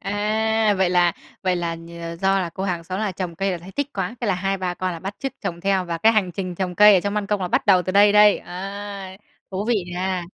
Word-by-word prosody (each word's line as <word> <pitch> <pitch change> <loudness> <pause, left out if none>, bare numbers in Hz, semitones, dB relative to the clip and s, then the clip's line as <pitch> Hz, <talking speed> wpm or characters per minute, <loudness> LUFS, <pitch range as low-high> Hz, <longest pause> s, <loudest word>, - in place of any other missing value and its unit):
À, 215 +2 +1
vậy 185 -2 +2
là 175 -1 +3 0.3
vậy 185 -1 +1
là 170 -1 -2
nhờ 170 0 -8
do 195 0 +3
là 175 - -3
cô 190 +3 -5
hàng 175 -3 -2
xóm 185 +3 -4
là 210 -3 -1
trồng 180 -2 -5
cây 195 +2 0
là 180 - -3
thấy 180 +3 -12
thích 285 +3 -2
quá, 195 +3 -3
thế 235 - -2
là 195 - +2
hai 195 +2 -1
ba 180 -1 -2
con 185 0 -2
là 165 - -6
bắt 195 +4 -6
chước 270 -1 -4
trồng 170 0 -4
theo 195 -1 +1
và 170 -1 -4
cái 225 +6 +5
hành 205 -5 +1
trình 185 -1 -4
trồng 180 0 -3
cây 210 +2 +8
ở 185 - +4
trong 200 +2 -3
ban 210 -1 -1
công 205 -1 -1
là 180 - -2
bắt - - 0
đầu 185 -3 +5
từ 185 - -3
đây 205 +1 +6
đây, 210 0 +6
à, 195 +1 -7 0.3
thú 195 +1 -3
vị 240 - +3 0.2
nha! 185 0 -2
190 Hz, 280 wpm, -22 LUFS, 180-205 Hz, 0.3 s, cây